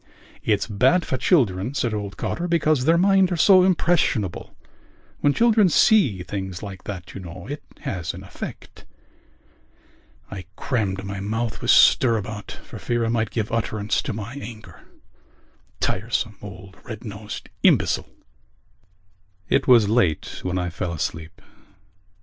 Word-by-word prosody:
"It's 105 -3 +1
bad 130 - +2
for - - -2
children," 120 - +1
said 120 -5 0
old 100 -2 -4
Cotter, 175 - -2
"because 155 -6 +2
their 165 +2 +4
minds 190 0 +4
are - - +1
so 185 +2 +6
impressionable. 165 - +1 0.6
When 145 - +3
children 220 +1 +4
see 140 - +4
things 95 -1 -5
like 95 -3 -8
that, 95 -3 -7
you - - -7
know, 85 0 -9
it 145 +2 -5 0.2
has 90 -3 -4
an - - -9
effect...." - - -9 1.5
I 95 -2 -7
crammed 100 -7 -2
my 100 -1 -5
mouth 110 +3 -3
with - - -3
stirabout 110 -3 +4
for - - -10
fear 120 -1 -1
I - - -1
might 115 -2 0
give 110 -2 -3
utterance 110 -2 -1
to - - -4
my 110 +3 -6
anger. 110 -2 -10 1.0
Tiresome 110 +1 -1
old 95 -1 -11
red 110 -1 -8
nosed 105 0 -7
imbecile! - - +3 1.4
It 135 - +2
was 120 -5 +6
late 105 -8 +1
when 90 0 -2
I 90 -1 -2
fell 85 0 -3
asleep. 80 +1 -5
110 Hz, 140 wpm, -23 LUFS, 95-140 Hz, 1.5 s, so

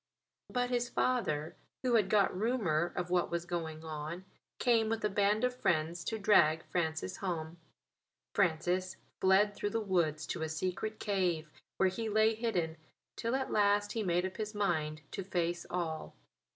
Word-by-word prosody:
But 245 0 0
his 240 -1 0
father, 160 -15 0 0.3
who 250 -2 +2
had 210 -4 +4
got 200 -3 +3
rumour 185 -7 +1
of 180 0 -3
what 180 -1 +2
was 170 0 -2
going 165 -2 -4
on, 160 +3 -5 0.3
came 225 -3 +3
with 225 -1 -1
a - - +2
band 205 +2 +2
of 250 0 +1
friends 170 -6 0
to 225 - -1
drag 160 -6 +4
Francis 165 +1 -2
home. 170 -3 -3 0.8
Francis 185 +1 +1 0.2
fled 195 +2 +4
through 205 - -2
the 225 - -1
woods 170 -7 0
to 170 - -4
a 160 - -1
secret 185 +7 -3
cave, 175 -7 0 0.3
where 190 - +4
he 220 +4 -3
lay 220 +1 +4
hidden 185 -8 -1 0.4
till 230 +2 -1
at 265 0 -2
last 205 0 +3
he 225 - -1
made 180 -2 +1
up 185 - -5
his 215 -1 -4
mind 155 -6 0
to 195 - -4
face 175 -2 -1
all. 165 -3 -3
185 Hz, 165 wpm, -33 LUFS, 165-215 Hz, 0.8 s, had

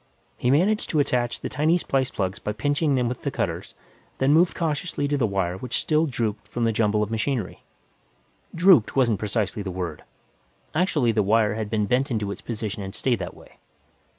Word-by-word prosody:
He 125 - -1
managed 185 +10 +2
to 155 - +1
attach 120 -4 0
the - - -3
tiny 155 +5 +2
splice 135 -6 -1
lugs 95 -1 -1
by 105 - -3
pinching 145 +6 +1
them 125 -2 +1
with 125 +1 -4
the - - -1
cutters, - - -3 0.4
then 135 +2 +3
moved 170 +3 +3
cautiously 155 -2 -1
to 145 - 0
the 130 -5 +1
wire 95 -3 -1
which 125 +3 -2
still 155 +1 +2
drooped 115 -5 -3
from 120 - -3
the 115 - +3
jumble 105 -1 +1
of 105 - -4
machinery. 115 -2 -2 0.9
"Drooped" 170 - +5
wasn't 120 -6 +2
precisely 105 -1 -1
the 100 - -4
word; 90 -4 -5 0.7
actually 155 -7 +2
the 110 -1 +2
wire 105 +1 +3
had 110 -1 -4
been 105 -1 +1
bent 125 +6 +1
into 105 -5 -1
its - - -7
position 110 -3 -4
and 95 0 -6
stayed 125 -3 0
that - - -6
way. - - -18
120 Hz, 195 wpm, -24 LUFS, 105-145 Hz, 0.9 s, Drooped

